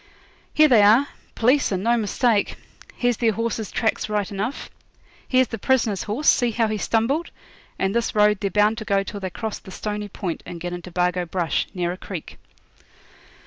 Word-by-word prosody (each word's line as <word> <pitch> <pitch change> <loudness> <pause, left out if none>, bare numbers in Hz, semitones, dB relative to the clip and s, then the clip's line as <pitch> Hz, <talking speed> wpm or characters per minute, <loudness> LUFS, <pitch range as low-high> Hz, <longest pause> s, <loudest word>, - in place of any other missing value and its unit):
'Here 310 0 +7
they 240 -7 +6
are 225 +8 +5 0.3
p'leece, 255 +3 +3
and 190 -1 -1
no 235 +2 +3
mistake. 225 0 +1 0.4
Here's 245 -2 +1
their 225 -2 +2
horses' 225 -1 -2
tracks 220 -1 -1
right 210 -2 -1
enough. 210 +7 -4 0.6
Here's 255 -1 +3
the 225 - -5
prisoner's 225 -5 +1
horse, 235 +9 -3
see 245 -1 +5
how 225 0 +1
he 215 - -1
stumbled? 265 +12 0 0.5
and 195 +1 0
this 235 -1 -1
road 210 -1 +4
they're 200 - 0
bound 210 +3 +2
to - - -5
go 195 -1 +1
till 205 +1 -7
they 190 -1 -4
cross 220 +4 -5
the - - -14
Stony 210 +2 -4
point, 185 -3 -4
and 175 - -8
get 175 +1 -5
into 175 0 -7
Bargo 180 0 0
Brush, 170 -1 -1
near 175 -1 -1
a 180 - -6
creek.' 185 -4 -8
210 Hz, 185 wpm, -23 LUFS, 190-235 Hz, 0.6 s, Here